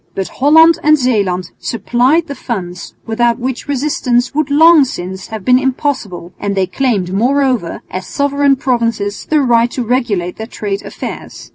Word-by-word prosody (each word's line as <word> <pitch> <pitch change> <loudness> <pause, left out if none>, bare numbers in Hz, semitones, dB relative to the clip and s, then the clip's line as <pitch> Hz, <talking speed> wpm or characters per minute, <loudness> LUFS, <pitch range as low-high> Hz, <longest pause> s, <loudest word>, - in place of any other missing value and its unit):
But 195 - -3
Holland 320 +4 +5
and 305 +1 +4
Zeeland 200 - -1
supplied 250 +7 +1
the 285 - -6
funds 180 -9 -6
without 235 +1 +1
which 255 +2 -4
resistance 255 -3 0
would 300 0 -1
long 320 +1 +6
since 190 -6 -6
have 220 -3 -7
been 250 0 +5
impossible, 255 - -3
and 200 -1 -2
they 190 -1 +1
claimed 190 -2 -1
moreover, 250 -3 0
as 185 0 -5
sovereign 280 0 +1
provinces, 230 -6 -2
the 305 -1 +3
right 235 -2 +3
to 250 - -4
regulate 220 -8 -1
their 220 - -6
trade 205 -4 -4
affairs. - - -8
245 Hz, 155 wpm, -15 LUFS, 200-275 Hz, -, long